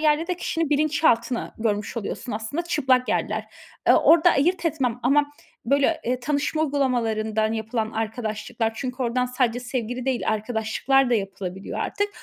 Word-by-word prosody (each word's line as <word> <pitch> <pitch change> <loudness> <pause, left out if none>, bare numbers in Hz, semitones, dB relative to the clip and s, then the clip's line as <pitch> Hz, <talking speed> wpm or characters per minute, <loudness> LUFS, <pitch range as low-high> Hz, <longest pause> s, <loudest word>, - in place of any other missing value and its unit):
yerde 310 +1 +2
de 360 - -2
kişinin 330 -3 -2
bilinçaltını 290 -5 +1
görmüş 210 0 -1
oluyorsun 230 +2 -4
aslında 220 +10 -3
çıplak 265 -7 +1
yerler. - - -1 0.4
Eee, - - +8
orda 335 +1 +6
ayırt 345 +6 +1
etmem 255 -7 -1
ama, 290 +3 +3 0.3
böyle, 280 +6 +2
eee, 250 +1 -1
tanışma 295 +3 0
uygulamalarından 225 -6 0
yapılan 220 0 -2
arkadaşlıklar 220 0 -3
çünkü 255 0 -4
oradan 250 +1 0
sadece 250 -1 0
sevgili 245 0 -4
değil 260 -2 -1
arkadaşlıklar 220 +4 +1
da - - +4
yapılabiliyor 195 -2 -4
artık. 410 0 -1
250 Hz, 140 wpm, -24 LUFS, 225-290 Hz, 0.4 s, Eee